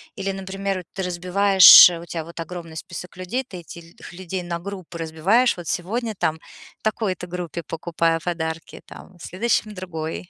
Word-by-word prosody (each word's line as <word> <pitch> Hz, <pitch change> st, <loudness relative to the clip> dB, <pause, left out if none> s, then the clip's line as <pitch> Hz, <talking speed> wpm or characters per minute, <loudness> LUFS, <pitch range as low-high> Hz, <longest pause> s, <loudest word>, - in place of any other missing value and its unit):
или, 195 Hz, -2 st, -3 dB
например, 195 Hz, 0 st, -4 dB
ты 190 Hz, -, -4 dB
разбиваешь? 180 Hz, 0 st, +8 dB
У -, -, -10 dB
тебя 165 Hz, -2 st, -5 dB
вот 170 Hz, +1 st, -11 dB
огромный 165 Hz, -1 st, -8 dB
список 175 Hz, +2 st, -8 dB
людей. 185 Hz, +9 st, -4 dB
Ты 180 Hz, -6 st, -9 dB
этих 170 Hz, +1 st, -13 dB
людей 185 Hz, 0 st, -6 dB
на 170 Hz, -1 st, -4 dB
группы 185 Hz, -2 st, -8 dB
разбиваешь: 170 Hz, +10 st, +1 dB
вот 175 Hz, -2 st, -10 dB
сегодня 220 Hz, +6 st, -3 dB
там 160 Hz, 0 st, 0 dB, 0.4 s
такой-то 210 Hz, -4 st, -2 dB
группе 175 Hz, -2 st, -6 dB
покупаю 165 Hz, 0 st, -1 dB
подарки, 165 Hz, -2 st, -5 dB
там, 180 Hz, -, -14 dB
в -, -, -14 dB
следующем- 215 Hz, +2 st, -1 dB
другой. 175 Hz, -2 st, -6 dB
180 Hz, 155 wpm, -22 LUFS, 165-195 Hz, 0.4 s, разбиваешь